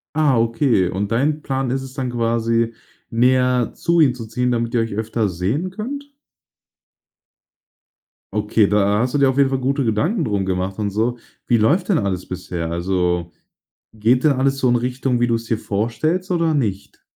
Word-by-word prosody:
Ah, 150 -5 +3
okay, 115 -4 +2
und 100 +3 -2
dein 145 +6 +1
Plan 135 -2 -2
ist 135 +1 -1
es 130 -1 -10
dann 130 -2 -3
quasi, 115 0 0 0.4
näher 125 +1 +2
zu 170 0 +1
ihm 135 -5 +4
zu 120 -2 -8
ziehen, 125 +3 -1
damit 115 0 -1
ihr 115 - +2
euch 115 -2 -3
öfter 110 0 -1
sehen 100 - -2
könnt? 280 +8 -6 2.2
Okay, 105 0 +2
da 105 +1 +2
hast 125 +1 0
du - - +2
dir 140 -1 +4
auf 130 - -2
jeden 140 -1 +4
Fall 135 -1 -1
gute 135 +2 0
Gedanken 155 - 0
drum 100 -5 -1
gemacht 95 +2 -2
und 105 -1 0
so. 115 +5 -1 0.3
Wie 120 - +4
läuft 150 - +2
denn 190 - +4
alles 95 -3 -2
bisher? 90 -2 -5
Also, 90 -1 -1 0.6
geht 115 +5 +2
da 145 -3 +4
alles 135 +1 +1
so 130 - +2
in 120 - +3
Richtung, 125 +1 -1
wie 120 - +2
du’s 115 -1 -1
dir 115 -1 -1
vorstellst 120 - -1
oder 165 -3 +1
nicht? 105 -9 -3
120 Hz, 180 wpm, -20 LUFS, 105-135 Hz, 2.2 s, ihm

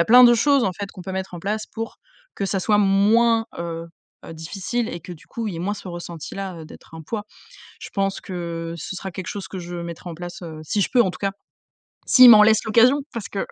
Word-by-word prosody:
a - - -2
plein 250 +2 +8
de 240 -1 +8
choses 275 +2 +3
en 185 - 0
fait 200 -1 -5
qu'on 190 - -11
peut 190 +1 -6
mettre 190 0 -4
en 175 - -7
place 215 +4 -2
pour 225 +1 -6 0.4
que 200 - -3
ça 195 -1 -1
soit 210 +2 +2
moins, 225 +4 +4
heu 165 -1 -5 0.4
heu, 165 - -8
difficile 200 +8 -3
et 170 - -5
que 175 +2 -9
du 165 - -14
coup, 230 -1 -4
il - - -4
y - - -6
ait - - -5
moins 205 +3 -1
ce 200 - -11
ressenti 175 -2 -7
là, 195 -3 -5
heu, 160 - -9
d'être 160 - -14
un 160 - -9
poids. 210 +6 -5 0.6
Je - - -8
pense 195 -1 -1
que 170 -2 -5
ce 180 +4 -6
sera 190 0 -6
quelque 185 +2 -7
chose 200 -1 -5
que 190 - -6
je 175 0 -7
mettrai 170 +1 -7
en 165 - -7
place, 175 +1 -8
heu, 160 -2 -8
si 205 +7 -2
je - - +1
peux 250 - +5
en 190 -6 +1
tout - - -10
cas, 195 -1 -1 0.8
s'ils 255 -2 +9
m'en 210 -2 +9
laissent 220 0 +4
l'occasion 235 +6 +4
parce 230 -4 -5
que 200 - -3
195 Hz, 260 wpm, -22 LUFS, 170-220 Hz, 0.8 s, s'ils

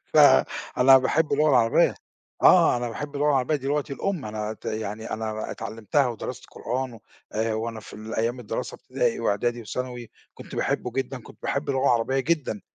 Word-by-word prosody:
فأنا 125 - +5
باحب 150 +5 +1
اللغة 150 +2 +3
العربية، 115 -4 +4 0.5
آه - - +6
أنا 120 0 -2
باحب 145 +5 -6
اللغة 145 +1 +1
العربية 140 +2 +2
دي 135 - -7
لغتي 145 0 -1
الأم، 180 -1 -2
أنا 110 0 -4
ت 110 - -16
يعني 110 0 -4
أنا 110 0 -3
ب - - -6
اتعلمتها 115 +4 -1
ودرست 120 -3 -5
قرآن 130 +1 -3
و 115 - -13 0.5
وأنا 110 0 -3
في - - -13
ال 110 +1 -7
أيام 120 +3 -1
الدراسة 110 - -4
ابتدائي - - -1
وإعدادي 120 +4 0
وثانوي، 125 +2 -5 0.2
كنت - - -11
باحبه 125 - -1
جدًا، 130 0 -3
كنت - - -15
باحب 140 +2 -2
اللغة 135 -1 0
العربية 130 +2 +2
جدًا، 145 -8 -1
125 Hz, 175 wpm, -25 LUFS, 110-135 Hz, 0.5 s, آه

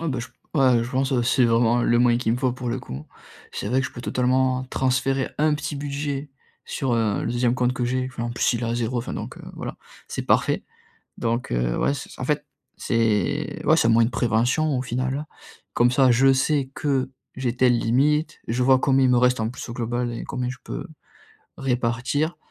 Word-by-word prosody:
Ah 165 - -2
bah, 130 -3 -2
je 120 - -4 0.5
ouais, - - 0
je 120 - -7
pense 130 -1 +1
c'est 125 +1 +3
vraiment 115 +1 +3
le 120 0 +3
moyen 120 -1 +4
qu'il 115 -2 0
me - - +1
faut, 130 -2 +1
pour 125 -1 -5
le 125 +2 -1
coup. 70 - -8 0.5
C'est 100 - -4
vrai 130 +3 +2
que 130 - -1
je - - -10
peux 120 - -8
totalement 130 +1 +1
transférer 130 +1 0
un 150 0 +3
petit 150 0 -4
budget 140 0 -4 0.3
sur, 135 -4 -2
heu, 110 -3 0
le - - -1
2e 120 0 +1
compte 125 0 +1
que 125 -1 -2
j'ai. 130 +1 0
Enfin 120 -1 -5
en 120 - -2
plus, 120 - +1
il 115 - -2
est - - -2
à 115 0 -1
0 120 +1 -1
enfin 115 - -4
donc - - -6 0.2
voilà, - - -6 0.3
c'est - - -4
parfait! - - +1 0.5
Donc, 120 +1 -2
heu, - - 0
ouais, 140 - +2
c'est, - - -8
c - - -12
en - - -2
fait 150 +1 0 0.3
c'est 115 -3 0
ouais, - - +5
c'est 115 - +3
un - - +4
moyen 115 0 +5
de 120 - -2
prévention, 125 +6 +1
au - - -1
final. 130 +4 -2 0.5
Comme 120 +1 +4
ça, 130 -1 +5
je 135 +3 +5
sais 135 0 +1
que, 135 -3 0 0.3
j'ai 125 -2 -2
telle 125 -1 +4
limite, 145 +7 +1
je 120 +3 -1
vois 130 0 +5
combien 135 -1 +3
il 125 - +4
me 125 - +4
reste 125 0 +3
en 110 0 0
plus, 130 - -8
au - - -5
global, 120 0 -2
et 115 - -5
combien 125 -2 -3
je 130 - -6
peux - - -6 0.7
répartir. 130 +5 -1
125 Hz, 225 wpm, -24 LUFS, 120-135 Hz, 0.7 s, ouais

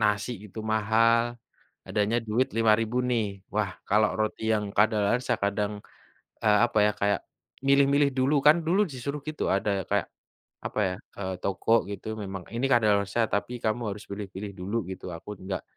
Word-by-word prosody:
nasi 105 +3 +1
itu 105 +2 -8
mahal, 115 +2 +2 0.5
adanya 105 +3 +1
duit 115 +5 +1
Rp5.000 115 +1 +3
nih, 115 -3 +2 0.3
wah 105 -2 0 0.2
kalau 105 +1 +4
roti 110 +1 -1
yang 105 -1 +1
kadaluwarsa 110 +3 +2
kadang, 100 +1 0 0.7
eee, 105 -1 +5
apa 120 -2 -3
ya, - - +2
kayak 100 0 +2 0.5
milih-milih 140 +1 +5
dulu 135 +3 +3
kan. 150 - +9
Dulu 190 +5 +3
disuruh 140 +3 -4
gitu 155 - -3
ada 100 +1 0 0.2
kayak, - - +1 0.6
apa - - -2
ya, 90 - -3 0.2
eee, 95 -2 -3
toko 100 +3 0 0.2
gitu, 100 - -7 0.2
"Memang 95 -1 -5
ini 125 +3 +1
kadaluwarsa 105 -2 +3
tapi 105 +4 -1
kamu 110 +2 0
harus 105 - -10
pilih-pilih 100 0 -6
dulu," 100 +5 -3
gitu. 95 - -8
Aku 85 - -15 0.2
nggak 95 -1 -3
110 Hz, 155 wpm, -27 LUFS, 100-120 Hz, 0.7 s, kan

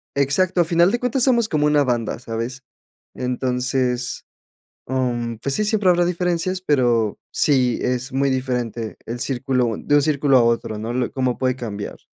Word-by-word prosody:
Exacto. 170 +7 +2
A - - +2
final 170 +3 +3
de 240 - 0
cuentas, 250 +1 0
somos 235 -4 +3
como 150 -1 +1
una 150 -1 +3
banda, 120 -3 -1
¿sabes? 115 +2 -5 0.5
Entonces, 125 0 -1 0.6
am, 120 -3 -1
pues 140 +3 -2
sí, 215 - 0
siempre 210 -3 +2
habrá 175 0 +4
diferencias, 180 +1 -1
pero 120 - +1
sí 130 -5 +2
es 125 +1 -2
muy 140 +1 +1
diferente, 125 -4 -3
el 120 +1 -5
círculo 125 -3 0
de 145 - +1
un 145 - +5
círculo 140 -3 +3
a - - +4
otro, 115 -2 0
¿no? 115 +2 -4
Lo 125 0 -1
cómo 130 -3 -1
puede 130 -1 0
cambiar. 105 -5 -6
130 Hz, 170 wpm, -21 LUFS, 120-155 Hz, 0.6 s, un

